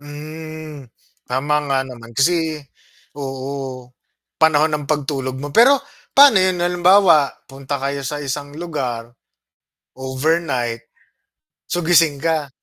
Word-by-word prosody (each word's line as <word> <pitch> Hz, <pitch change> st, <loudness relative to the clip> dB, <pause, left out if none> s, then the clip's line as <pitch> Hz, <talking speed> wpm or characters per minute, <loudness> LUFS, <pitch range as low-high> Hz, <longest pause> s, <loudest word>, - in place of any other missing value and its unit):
Hmm, 155 Hz, -1 st, -9 dB, 0.3 s
tama 135 Hz, +4 st, -1 dB, 0.2 s
nga 135 Hz, -, +2 dB
naman 120 Hz, -2 st, -11 dB
kasi 160 Hz, +1 st, +1 dB, 0.6 s
oo, 135 Hz, -2 st, -6 dB, 0.6 s
panahon 155 Hz, 0 st, +4 dB
ng 145 Hz, -1 st, -4 dB
pagtulog 135 Hz, -3 st, -2 dB
mo, 145 Hz, +1 st, -7 dB
pero 265 Hz, +4 st, +6 dB, 0.3 s
paano 275 Hz, -9 st, +7 dB
'yon, 185 Hz, -1 st, +1 dB
halimbawa 175 Hz, -3 st, +4 dB, 0.2 s
punta 135 Hz, +1 st, -5 dB
kayo 140 Hz, +1 st, -3 dB
sa 145 Hz, +3 st, -4 dB
isang 145 Hz, 0 st, -4 dB
lugar, 125 Hz, -9 st, -4 dB, 0.8 s
overnight, 130 Hz, -3 st, -1 dB, 0.8 s
so 175 Hz, -2 st, -2 dB
gising 165 Hz, -4 st, +4 dB
ka? 155 Hz, -1 st, -1 dB
145 Hz, 110 wpm, -19 LUFS, 135-160 Hz, 0.8 s, paano